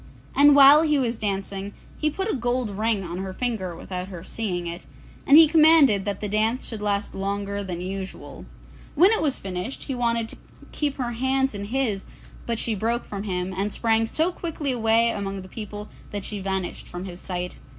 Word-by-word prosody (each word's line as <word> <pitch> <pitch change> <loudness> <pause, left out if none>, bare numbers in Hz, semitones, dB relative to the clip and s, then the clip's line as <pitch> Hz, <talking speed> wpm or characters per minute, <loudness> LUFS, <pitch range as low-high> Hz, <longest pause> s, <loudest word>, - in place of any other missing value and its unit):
And 290 0 +7
while 285 +2 +9
he 300 -2 +2
was 245 -3 0
dancing, 200 -1 -4 0.2
he 305 - +2
put 380 +6 -3
a 440 - 0
gold 245 -2 -1
ring 215 0 0
on 175 0 -5
her 190 0 -5
finger 210 -7 -2
without 180 +2 -5
her 175 -4 -8
seeing 185 -4 -3
it, 170 +1 -6 0.4
and 280 - +8
he 320 -1 +9
commanded 305 - +5
that 200 -1 -3
the 210 - -2
dance 220 +4 0
should 220 -3 -6
last 205 -1 -1
longer 200 +1 -3
than 180 -3 -5
usual. 190 +1 -7 0.5
When 360 +7 +6
it 445 - +1
was 290 -4 0
finished 190 +6 -5
he 275 - -4
wanted 235 -2 0
to - - -10 0.3
keep 290 -2 -1
her 245 -3 -2
hands 265 +2 0
in 200 0 -5
his, 220 -4 -1 0.4
but 235 -1 0
she 225 - -1
broke 230 +4 -1
from 200 0 -6
him, 185 -1 -2
and 200 +3 -1
sprang 225 0 +1
so 320 +9 +1
quickly 320 -5 -3
away 230 -1 +3
among 195 -1 -4
the - - -11
people 210 0 -7 0.2
that 205 -2 -5
she 210 - -4
vanished 190 -1 -3
from 180 +1 -7
his 180 -2 -8
sight. 180 -1 -5
215 Hz, 200 wpm, -24 LUFS, 195-255 Hz, 0.5 s, while